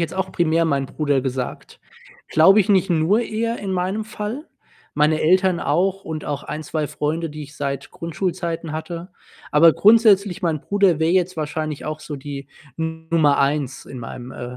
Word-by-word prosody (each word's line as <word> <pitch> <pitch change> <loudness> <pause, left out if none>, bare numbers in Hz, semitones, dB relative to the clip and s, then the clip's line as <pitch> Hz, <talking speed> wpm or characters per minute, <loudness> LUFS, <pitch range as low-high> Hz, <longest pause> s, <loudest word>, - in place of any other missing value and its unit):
jetzt 165 +1 -2
auch 190 0 -2
primär 165 -1 +2
meinen 140 -3 0
Bruder 145 -1 0
gesagt. 130 -1 -5 0.5
Glaube 190 +7 +6
ich, 190 - -1
nicht 195 -1 +3
nur 170 +7 +3
eher 230 +1 -2
in 195 -2 -4
meinem 185 +4 -1
Fall, 220 +7 -5 0.5
meine 150 +1 +2
Eltern 185 +2 +3
auch 195 +2 0
und 155 -1 -5
auch 145 -1 -3
1, 155 +1 -5
2 155 0 -2
Freunde, 150 +2 -2
die 150 0 -8
ich 145 +1 -12
seit 140 -1 -4
Grundschulzeiten 170 -1 -3
hatte. 170 +3 -6 0.4
Aber 160 +2 +6
grundsätzlich, 205 -3 +4
mein 160 -4 0
Bruder 195 -5 +2
wäre 160 +1 +2
jetzt 185 -1 +1
wahrscheinlich 155 -1 -3
auch 155 0 -4
so 150 -1 -6
die 140 0 -7 0.3
Nummer 160 -2 +1
1 140 -1 0
in 130 - -8
meinem 120 +2 -8
äh, 125 +1 -7
160 Hz, 175 wpm, -21 LUFS, 150-185 Hz, 0.5 s, Glaube